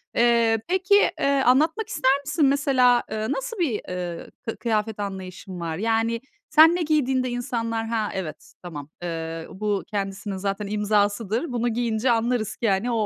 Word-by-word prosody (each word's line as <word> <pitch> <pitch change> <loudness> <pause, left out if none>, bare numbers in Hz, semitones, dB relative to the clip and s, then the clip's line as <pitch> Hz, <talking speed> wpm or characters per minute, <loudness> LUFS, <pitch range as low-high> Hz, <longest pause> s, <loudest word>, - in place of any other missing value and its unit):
Eee, 235 -1 +4
peki, 375 +2 +3 0.2
eee, - - +1 0.2
anlatmak 310 - +3
ister 280 -8 +2
misin? 305 +1 +2
Mesela, 265 -3 +4
ııı, 220 +2 -2
nasıl 285 - -3
bir, 265 -12 0
eee, 175 -2 -5 0.2
kı 225 - -3
kıyafet 220 -2 -1
anlayışın 190 -2 -6
var? 165 -2 -3
Yani 225 +2 0 0.3
sen 320 +2 +7
ne 355 - -1
giydiğinde 265 -5 +1
insanlar, 230 -2 -2
"Ha, 225 -2 -1
evet, 155 -5 -6
tamam. 150 -5 -7
Eee, 165 -1 -4
bu 205 0 -2
kendisinin 195 0 -4
zaten 200 +1 -3
imzasıdır, 210 - 0
bunu 240 0 0
giyince 235 +1 0
anlarız 230 -1 0
ki, 230 - 0
hani, 200 +5 +1
o 225 -2 +1
225 Hz, 155 wpm, -24 LUFS, 195-255 Hz, 0.3 s, sen